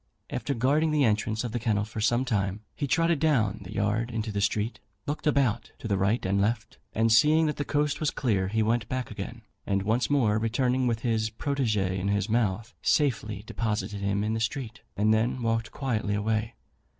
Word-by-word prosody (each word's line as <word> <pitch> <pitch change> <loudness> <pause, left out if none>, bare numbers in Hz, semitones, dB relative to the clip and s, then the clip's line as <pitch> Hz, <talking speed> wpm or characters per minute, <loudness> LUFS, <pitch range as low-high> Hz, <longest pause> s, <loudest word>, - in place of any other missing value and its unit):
After 140 - -2
guarding 145 +7 +2
the 150 -2 +2
entrance 110 -1 +1
of 120 - -3
the 120 - -2
kennel 110 -3 +1
for 110 0 -6
some 120 +4 +2
time, 100 -4 -1
he 145 - -2
trotted 165 +2 +2
down 115 -10 +2
the 95 - -9
yard 105 +4 0
into 110 -2 -3
the 100 -1 -2
street, 105 +2 0 0.3
looked 150 +2 -3
about 130 -6 +1
to - - -6
the 100 - +1
right 100 +5 +1
and 100 +1 +1
left, 110 +2 -1 0.2
and 115 +1 +3
seeing 155 +7 +5
that 150 - -1
the 145 - -1
coast 145 0 0
was 155 - +1
clear, 100 -8 0
he 110 +3 +1
went 115 0 0
back 130 -2 -3
again, - - -7 0.2
and 100 -1 0
once 115 +5 +1
more 115 -7 +3
returning 125 +3 +1
with 115 -1 0
his 110 -3 0
protégé 110 -7 -1
in 95 - -2
his 100 0 +1
mouth, 110 0 0
safely 110 -8 +1
deposited 105 -3 -2
him 100 +1 0
in 110 +1 0
the 110 - -1
street, 115 0 -3 0.2
and 105 +2 +3
then 120 +3 0
walked 115 -1 0
quietly 110 -6 -1
away. 110 +2 -1
110 Hz, 200 wpm, -27 LUFS, 105-130 Hz, 0.3 s, seeing